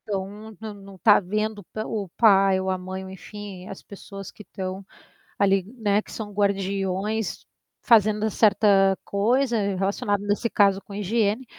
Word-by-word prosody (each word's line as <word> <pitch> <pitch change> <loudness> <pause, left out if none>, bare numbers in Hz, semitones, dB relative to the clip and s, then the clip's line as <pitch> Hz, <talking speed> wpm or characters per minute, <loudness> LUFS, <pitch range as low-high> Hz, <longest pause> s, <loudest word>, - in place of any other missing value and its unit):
Então, 210 +1 -5
nã 220 -1 -6
não 195 -1 -13
tá 205 +4 +6
vendo 215 +3 -2
o - - -11
pa 215 +5 -6
o 205 -4 -4
pai 195 -4 +5
ou 190 0 -2
a 185 - 0
mãe 185 +1 -6
ou 190 - -9
enfim, 190 0 -9
as 195 - -9
pessoas 195 -1 -10
que - - -14
estão 190 -1 -6 0.5
ali, 195 -1 +3
né, 210 -2 +2
que - - -15
são 215 -2 -6
guardiões, 200 +1 -1 0.4
fazendo 215 -1 +4
certa 200 -3 +4
coisa 235 +5 +1 0.2
relacionado 200 +1 -1
nesse 205 +3 0
caso 200 -2 +3
com 200 - -13
higiene, 210 +4 0
200 Hz, 160 wpm, -24 LUFS, 195-215 Hz, 0.5 s, tá